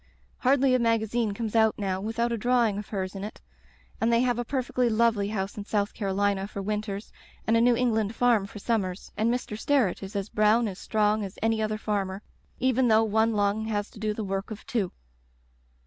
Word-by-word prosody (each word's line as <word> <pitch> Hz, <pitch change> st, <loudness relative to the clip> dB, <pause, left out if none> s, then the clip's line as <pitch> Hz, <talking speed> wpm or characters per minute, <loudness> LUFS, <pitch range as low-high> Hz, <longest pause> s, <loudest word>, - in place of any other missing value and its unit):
Hardly 265 Hz, 0 st, +3 dB
a 255 Hz, -, +4 dB
magazine 230 Hz, -2 st, +1 dB
comes 225 Hz, 0 st, -4 dB
out 220 Hz, -1 st, +4 dB
now 190 Hz, -2 st, -2 dB
without 235 Hz, +3 st, -1 dB
a 235 Hz, -, 0 dB
drawing 235 Hz, -3 st, +2 dB
of 210 Hz, -, -7 dB
hers 190 Hz, -3 st, -3 dB
in 195 Hz, -1 st, -6 dB
it, 210 Hz, -, -7 dB, 0.6 s
and 225 Hz, +1 st, +3 dB
they 235 Hz, 0 st, +4 dB
have 245 Hz, -1 st, +1 dB
a -, -, 0 dB
perfectly 250 Hz, -1 st, 0 dB
lovely 225 Hz, -2 st, +2 dB
house 200 Hz, -2 st, -3 dB
in 205 Hz, -, -4 dB
South 205 Hz, -1 st, -1 dB
Carolina 200 Hz, -1 st, 0 dB
for 200 Hz, -, -7 dB
winters 210 Hz, 0 st, -3 dB, 0.3 s
and 225 Hz, -, +3 dB
a 230 Hz, -, +4 dB
New 240 Hz, 0 st, +5 dB
Eng 250 Hz, 0 st, +2 dB
land 220 Hz, 0 st, -1 dB
farm 235 Hz, -5 st, +3 dB
for 205 Hz, -, -11 dB
summers, 200 Hz, -4 st, -2 dB
and 225 Hz, +2 st, +1 dB
Mr, 245 Hz, -3 st, -3 dB
Sterret 235 Hz, -3 st, +1 dB
is 195 Hz, +1 st, -8 dB
as 200 Hz, 0 st, -2 dB
brown 215 Hz, +2 st, +3 dB
and 195 Hz, -, -5 dB
strong 210 Hz, +1 st, +1 dB
as 195 Hz, -1 st, -7 dB
any 225 Hz, -1 st, +2 dB
other 215 Hz, 0 st, -1 dB
farmer, 200 Hz, -2 st, -2 dB, 0.3 s
even 255 Hz, 0 st, +2 dB
though 220 Hz, 0 st, +5 dB
one 220 Hz, +1 st, +2 dB
lung 205 Hz, +1 st, +1 dB
has 205 Hz, -2 st, -2 dB
to -, -, -13 dB
do 215 Hz, 0 st, -1 dB
the 215 Hz, +1 st, -4 dB
work 195 Hz, 0 st, -3 dB
of 215 Hz, -1 st, -8 dB
two. 210 Hz, -7 st, -1 dB
215 Hz, 210 wpm, -27 LUFS, 200-230 Hz, 0.6 s, New